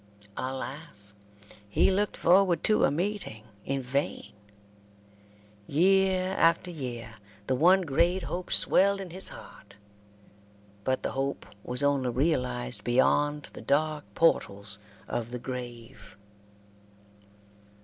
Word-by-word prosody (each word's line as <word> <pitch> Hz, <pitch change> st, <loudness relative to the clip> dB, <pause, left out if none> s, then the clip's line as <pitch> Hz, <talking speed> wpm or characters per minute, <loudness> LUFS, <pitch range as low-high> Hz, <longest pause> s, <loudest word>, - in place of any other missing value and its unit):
Alas! 130 Hz, -5 st, -5 dB, 0.6 s
he 105 Hz, -, +3 dB
looked 205 Hz, +2 st, 0 dB
forward 180 Hz, -1 st, +4 dB
to 215 Hz, -, +4 dB
a -, -, +3 dB
meeting 175 Hz, -, -3 dB, 0.2 s
in 135 Hz, 0 st, -1 dB
vain. 135 Hz, +3 st, -2 dB, 1.3 s
Year 185 Hz, +3 st, +3 dB
after 170 Hz, +2 st, +3 dB
year 120 Hz, -7 st, -6 dB, 0.3 s
the 130 Hz, -, 0 dB
one 180 Hz, +8 st, +5 dB
great 175 Hz, +4 st, +1 dB
hope 180 Hz, +1 st, -5 dB
swelled 200 Hz, +1 st, +4 dB
in 190 Hz, -3 st, -7 dB
his 190 Hz, +2 st, -1 dB
heart, 100 Hz, -, -13 dB, 1.1 s
but 130 Hz, +3 st, -1 dB
the -, -, -1 dB
hope 135 Hz, +1 st, -3 dB, 0.2 s
was 125 Hz, +3 st, -3 dB
only 140 Hz, -3 st, +2 dB
realized 125 Hz, -4 st, -1 dB
beyond 145 Hz, +4 st, +2 dB
the -, -, -9 dB
dark 150 Hz, +1 st, 0 dB
portals 100 Hz, -10 st, +1 dB, 0.3 s
of 120 Hz, -1 st, -3 dB
the 125 Hz, -, -5 dB
grave. 120 Hz, -5 st, -8 dB
140 Hz, 110 wpm, -28 LUFS, 125-175 Hz, 1.3 s, one